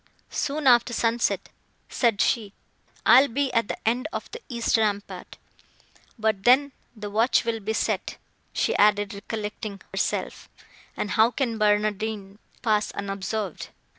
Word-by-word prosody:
"Soon 295 Hz, +1 st, -2 dB
after 240 Hz, -1 st, +5 dB
sunset," 230 Hz, +1 st, 0 dB, 0.4 s
said 230 Hz, -5 st, +1 dB
she, 210 Hz, -4 st, +1 dB, 0.5 s
"I 255 Hz, -, +9 dB
will 285 Hz, -, +1 dB
be 280 Hz, -1 st, 0 dB
at 230 Hz, -2 st, +2 dB
the -, -, -4 dB
end 245 Hz, +6 st, +1 dB
of -, -, -6 dB
the 470 Hz, -, -8 dB
east 235 Hz, -1 st, 0 dB
rampart. 205 Hz, -2 st, -2 dB, 0.8 s
But 220 Hz, -3 st, 0 dB
then 270 Hz, +4 st, +5 dB, 0.2 s
the 210 Hz, -1 st, -7 dB
watch 230 Hz, +4 st, +2 dB
will 230 Hz, -1 st, -1 dB
be 215 Hz, +1 st, -3 dB
set," -, -, -1 dB, 0.3 s
she -, -, 0 dB
added, 205 Hz, -1 st, +3 dB
recollecting 210 Hz, 0 st, -5 dB
herself, -, -, -2 dB, 0.5 s
"and 205 Hz, -, -2 dB
how 220 Hz, +1 st, +5 dB
can 235 Hz, -2 st, -2 dB
Barnardine 210 Hz, -1 st, 0 dB, 0.2 s
pass 215 Hz, -2 st, +2 dB
unobserved?" 200 Hz, -1 st, -4 dB
220 Hz, 135 wpm, -25 LUFS, 205-240 Hz, 0.8 s, I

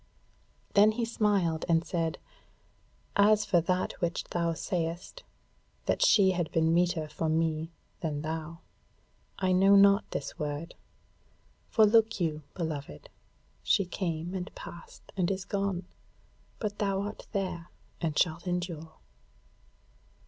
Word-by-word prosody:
Then 210 Hz, +2 st, +6 dB
he 235 Hz, +1 st, -1 dB
smiled 200 Hz, -8 st, +1 dB
and 165 Hz, 0 st, +3 dB
said; 165 Hz, -2 st, -1 dB, 1.0 s
"As 210 Hz, +1 st, +5 dB
for 175 Hz, -4 st, +3 dB
that 180 Hz, +2 st, 0 dB
which 170 Hz, -1 st, -1 dB
thou 170 Hz, -1 st, -1 dB
sayest, 175 Hz, -, -3 dB, 0.6 s
that -, -, 0 dB
she 195 Hz, -3 st, +6 dB
had 175 Hz, -3 st, -2 dB
been 165 Hz, 0 st, +2 dB
meeter 175 Hz, -2 st, +1 dB
for 150 Hz, +1 st, -2 dB
me 160 Hz, 0 st, 0 dB, 0.3 s
than 150 Hz, -3 st, -3 dB
thou, 160 Hz, +1 st, -5 dB, 0.8 s
I 185 Hz, -1 st, +1 dB
know 195 Hz, +2 st, +6 dB
not 200 Hz, +1 st, +5 dB
this -, -, -5 dB
word. 150 Hz, +2 st, -4 dB, 1.0 s
For 220 Hz, -, +5 dB
look 225 Hz, 0 st, +4 dB
you, 155 Hz, -3 st, -1 dB
beloved, 150 Hz, -, -5 dB, 0.5 s
she 195 Hz, -, +2 dB
came, 175 Hz, -1 st, -3 dB
and 185 Hz, -1 st, -4 dB
passed, 170 Hz, -, -11 dB
and 180 Hz, -3 st, +1 dB
is 190 Hz, -1 st, -2 dB
gone, 195 Hz, -2 st, -2 dB, 0.7 s
but 205 Hz, -1 st, -4 dB
thou 195 Hz, -2 st, 0 dB
art 205 Hz, +1 st, -6 dB
there 185 Hz, -4 st, -3 dB, 0.3 s
and 155 Hz, -3 st, -1 dB
shalt 175 Hz, +1 st, +1 dB
endure." 175 Hz, -3 st, -3 dB
175 Hz, 125 wpm, -29 LUFS, 165-195 Hz, 1.0 s, Then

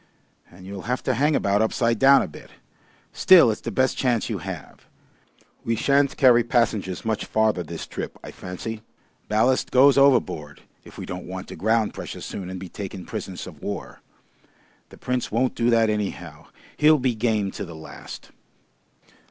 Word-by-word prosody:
And 90 Hz, +1 st, -15 dB
you'll 100 Hz, +1 st, -8 dB
have 125 Hz, -, -1 dB
to 130 Hz, -, +1 dB
hang 145 Hz, +5 st, +2 dB
about 100 Hz, -2 st, +1 dB
upside 115 Hz, 0 st, +1 dB
down 135 Hz, +1 st, +6 dB
a -, -, -4 dB
bit. -, -, -13 dB, 0.6 s
Still, 180 Hz, -11 st, +6 dB
it's 105 Hz, -, -5 dB
the -, -, -4 dB
best 130 Hz, +4 st, +1 dB
chance 120 Hz, -3 st, 0 dB
you 105 Hz, -, -2 dB
have. 90 Hz, -2 st, -9 dB, 0.8 s
We 115 Hz, -, 0 dB
shan't 140 Hz, +4 st, +2 dB
carry 120 Hz, -3 st, +6 dB
passengers 110 Hz, -6 st, 0 dB
much 110 Hz, -1 st, -1 dB
farther 110 Hz, -4 st, +1 dB
this 85 Hz, -1 st, -7 dB
trip, -, -, -7 dB
I -, -, -8 dB
fancy. 105 Hz, +5 st, -7 dB, 0.5 s
Ballast 115 Hz, +5 st, +2 dB
goes 135 Hz, +2 st, +5 dB
over 135 Hz, -3 st, +6 dB
board 75 Hz, -7 st, -9 dB, 0.2 s
if -, -, -15 dB
we -, -, -6 dB
don't 90 Hz, 0 st, -7 dB
want 95 Hz, 0 st, -7 dB
to -, -, -7 dB
ground 110 Hz, +1 st, +1 dB
precious -, -, -7 dB
soon 90 Hz, -2 st, -6 dB
and 95 Hz, 0 st, -6 dB
be 95 Hz, -, -7 dB
taken 95 Hz, 0 st, -7 dB
prisoners -, -, -6 dB
of -, -, -12 dB
war. -, -, -6 dB, 0.9 s
The -, -, -15 dB
Prince 125 Hz, -1 st, -3 dB
won't 120 Hz, +3 st, +1 dB
do 120 Hz, 0 st, 0 dB
that 115 Hz, -1 st, +4 dB
anyhow. 105 Hz, -2 st, -4 dB, 0.3 s
He'll 155 Hz, +1 st, +5 dB
be 130 Hz, -2 st, 0 dB
game 110 Hz, -3 st, 0 dB
to -, -, -6 dB
the 85 Hz, -4 st, -9 dB
last." 80 Hz, -, -11 dB
110 Hz, 175 wpm, -24 LUFS, 95-125 Hz, 0.9 s, down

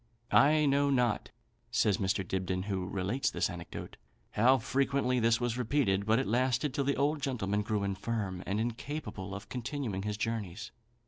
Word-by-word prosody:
"I 150 Hz, +2 st, +5 dB
know 140 Hz, 0 st, +3 dB
not 125 Hz, -5 st, +1 dB, 0.4 s
(says 110 Hz, -5 st, +2 dB
Mr. 95 Hz, -1 st, 0 dB
Dibdin, 95 Hz, -1 st, -1 dB
who 95 Hz, -3 st, -2 dB
relates 100 Hz, +8 st, -1 dB
this -, -, -1 dB
anecdote), -, -, -8 dB, 0.3 s
how 125 Hz, +5 st, +5 dB
frequently 130 Hz, +1 st, +1 dB
this 115 Hz, 0 st, +3 dB
was 120 Hz, 0 st, -1 dB
repeated; 110 Hz, -6 st, +1 dB
but 110 Hz, +1 st, +4 dB
it 135 Hz, -, +1 dB
lasted 130 Hz, +4 st, +1 dB
till 140 Hz, -, 0 dB
the 140 Hz, -, +1 dB
old 145 Hz, +2 st, +1 dB
gentleman 105 Hz, -8 st, -1 dB
grew 105 Hz, -1 st, -1 dB
infirm, 100 Hz, -1 st, -2 dB
and 100 Hz, +2 st, 0 dB
incapable 115 Hz, -4 st, -4 dB
of 100 Hz, -, -8 dB
continuing 125 Hz, -5 st, -3 dB
his 105 Hz, +1 st, -3 dB
journeys. 110 Hz, -3 st, -3 dB
115 Hz, 165 wpm, -31 LUFS, 100-135 Hz, 0.4 s, I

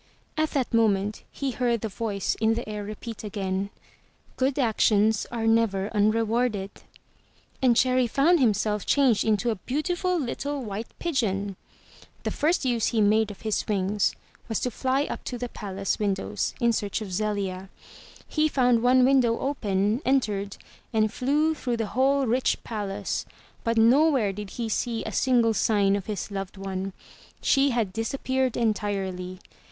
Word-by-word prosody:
At 310 Hz, 0 st, +1 dB
that 260 Hz, -4 st, 0 dB
moment 210 Hz, -2 st, +2 dB
he 275 Hz, -1 st, -3 dB
heard 240 Hz, -3 st, 0 dB
the 225 Hz, -, -2 dB
voice 205 Hz, -1 st, -2 dB
in 225 Hz, 0 st, +3 dB
the 235 Hz, -, -4 dB
air 210 Hz, -1 st, -4 dB
repeat 215 Hz, +2 st, -7 dB
again: 195 Hz, -1 st, -2 dB, 0.7 s
*'Good 265 Hz, +1 st, 0 dB
actions 220 Hz, -4 st, +2 dB
are 230 Hz, -2 st, -2 dB
never 225 Hz, -3 st, +2 dB
unrewarded/* 215 Hz, -1 st, +1 dB, 0.9 s
and 250 Hz, -3 st, +4 dB
Cherry 255 Hz, -1 st, +3 dB
found 315 Hz, +9 st, +3 dB
him 230 Hz, -6 st, +4 dB
self 210 Hz, -1 st, -1 dB
changed 265 Hz, -7 st, +3 dB
into 220 Hz, +2 st, +1 dB
a 220 Hz, -, -3 dB
beautiful 350 Hz, -, -1 dB
little 280 Hz, +1 st, -3 dB
white 215 Hz, +1 st, -5 dB
pigeon. 205 Hz, -, -1 dB, 0.7 s
The -, -, -1 dB
first 320 Hz, -1 st, +1 dB
use 240 Hz, -3 st, +1 dB
he 230 Hz, -, 0 dB
made 215 Hz, +1 st, +3 dB
of 205 Hz, -, -10 dB
his 215 Hz, -1 st, -1 dB
wings 205 Hz, -1 st, +1 dB, 0.3 s
was 225 Hz, -, 0 dB
to 250 Hz, -, -1 dB
fly 265 Hz, +3 st, 0 dB
up -, -, -5 dB
to 245 Hz, -, -4 dB
the 245 Hz, +1 st, -4 dB
palace 195 Hz, -3 st, -3 dB
windows 205 Hz, 0 st, -1 dB
in 235 Hz, -2 st, +3 dB
search 205 Hz, 0 st, -2 dB
of 195 Hz, -4 st, -6 dB
Zelia. 195 Hz, -2 st, -2 dB, 0.6 s
He 310 Hz, 0 st, +2 dB
found 250 Hz, -5 st, +3 dB
one 250 Hz, +1 st, +5 dB
window 255 Hz, -4 st, +3 dB
open, 210 Hz, -4 st, 0 dB
entered, 210 Hz, -7 st, 0 dB, 0.3 s
and 215 Hz, -2 st, +1 dB
flew 295 Hz, +5 st, +1 dB
through 250 Hz, -6 st, -2 dB
the 225 Hz, -, -1 dB
whole 270 Hz, +3 st, +3 dB
rich 250 Hz, +2 st, +1 dB
palace, 205 Hz, -3 st, -3 dB, 0.4 s
but 230 Hz, -1 st, 0 dB
nowhere 245 Hz, -2 st, +4 dB
did 205 Hz, 0 st, -7 dB
he 235 Hz, -2 st, -2 dB
see 225 Hz, +1 st, -1 dB
a 220 Hz, -, -5 dB
single 235 Hz, 0 st, +3 dB
sign 200 Hz, -2 st, +2 dB
of 200 Hz, -2 st, -4 dB
his 210 Hz, -1 st, -4 dB
loved 195 Hz, 0 st, -5 dB
one. 190 Hz, 0 st, -4 dB, 0.5 s
She 275 Hz, 0 st, +3 dB
had 230 Hz, -7 st, -1 dB
disappeared 260 Hz, +3 st, -1 dB
entirely. 195 Hz, -5 st, -2 dB
225 Hz, 155 wpm, -26 LUFS, 205-255 Hz, 0.9 s, one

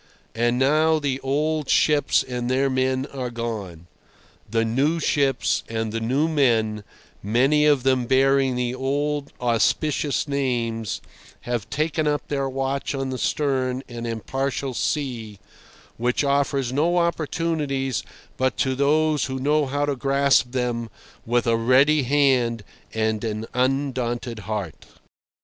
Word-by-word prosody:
And 120 Hz, +1 st, +1 dB
now 155 Hz, +4 st, +3 dB
the 140 Hz, -3 st, -1 dB
old 150 Hz, +2 st, -1 dB
ships 150 Hz, -1 st, +3 dB
and 125 Hz, -1 st, -4 dB
their 135 Hz, +1 st, +1 dB
men 130 Hz, 0 st, 0 dB
are 130 Hz, -2 st, -3 dB
gone; 110 Hz, -8 st, -5 dB, 0.6 s
the 115 Hz, +1 st, +1 dB
new 140 Hz, +9 st, +1 dB
ships 140 Hz, -4 st, +1 dB
and 110 Hz, -1 st, -2 dB
the 115 Hz, -, -2 dB
new 130 Hz, +7 st, +1 dB
men, 115 Hz, -9 st, +1 dB, 0.4 s
many 135 Hz, +8 st, +3 dB
of 145 Hz, -4 st, +3 dB
them 130 Hz, -2 st, +2 dB
bearing 135 Hz, 0 st, +3 dB
the 125 Hz, 0 st, -1 dB
old, 145 Hz, +2 st, -2 dB
auspicious 135 Hz, +5 st, +1 dB
names, 120 Hz, -6 st, -2 dB, 0.4 s
have 120 Hz, -3 st, -3 dB
taken 155 Hz, +1 st, -1 dB
up 145 Hz, 0 st, -1 dB
their 140 Hz, -2 st, -1 dB
watch 135 Hz, +1 st, -2 dB
on 135 Hz, -1 st, -3 dB
the 130 Hz, -, -4 dB
stern 130 Hz, -3 st, 0 dB
and 120 Hz, -1 st, -6 dB
impartial 135 Hz, +4 st, -3 dB
sea, 120 Hz, -7 st, -2 dB, 0.6 s
which 120 Hz, +4 st, 0 dB
offers 140 Hz, -2 st, 0 dB
no 165 Hz, +6 st, +2 dB
opportunities 155 Hz, -6 st, -1 dB, 0.4 s
but 130 Hz, -4 st, 0 dB
to 130 Hz, -, +1 dB
those 150 Hz, +3 st, +2 dB
who 130 Hz, -1 st, -4 dB
know 145 Hz, +2 st, +1 dB
how 145 Hz, +2 st, 0 dB
to 145 Hz, -1 st, -1 dB
grasp 135 Hz, -1 st, +2 dB
them 120 Hz, -2 st, -2 dB, 0.4 s
with 120 Hz, 0 st, +1 dB
a 115 Hz, -1 st, +2 dB
ready 135 Hz, +6 st, +4 dB
hand 130 Hz, -4 st, +2 dB, 0.3 s
and 110 Hz, 0 st, -1 dB
an 110 Hz, -1 st, -3 dB
undaunted 125 Hz, -3 st, -1 dB
heart. 105 Hz, -6 st, -5 dB
130 Hz, 135 wpm, -23 LUFS, 120-145 Hz, 0.6 s, ready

